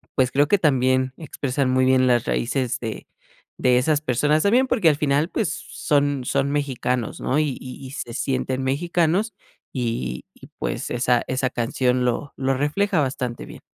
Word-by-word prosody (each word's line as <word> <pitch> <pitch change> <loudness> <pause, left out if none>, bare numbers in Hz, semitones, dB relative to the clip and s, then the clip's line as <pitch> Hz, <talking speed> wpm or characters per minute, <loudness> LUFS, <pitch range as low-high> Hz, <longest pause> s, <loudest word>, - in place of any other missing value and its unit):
pues, 130 -1 +3
creo 145 +2 +3
que 205 - +3
también 130 -4 +2
expresan 140 -4 -2
muy 130 0 +3
bien 130 0 +4
las 120 -2 +3
raíces 125 0 -1
de 115 -3 -6 0.5
de 125 -1 +3
esas 150 +3 +1
personas 150 +2 +1
también, 245 +6 +4
porque 220 -10 +3
al 150 - +3
final, 145 +2 +1
pues, 210 -5 -1
s - - -9
son 145 -2 +1
son 140 +2 0
mexicanos, 130 -4 -2
¿no? 140 - 0
Y 150 -4 0
y 130 +1 -9
y - - -10
se 120 -3 -6
sienten 130 +1 -1
mexicanos 175 - +1 0.4
y 115 - -3
y - - -14
pues - - -3
esa 120 0 +2
esa 130 0 0
canción 125 +1 0
lo 125 +4 -2
lo 135 0 +1
refleja 155 +7 +1
bastante 130 -3 -3
bien. - - -12
130 Hz, 175 wpm, -23 LUFS, 125-150 Hz, 0.5 s, bien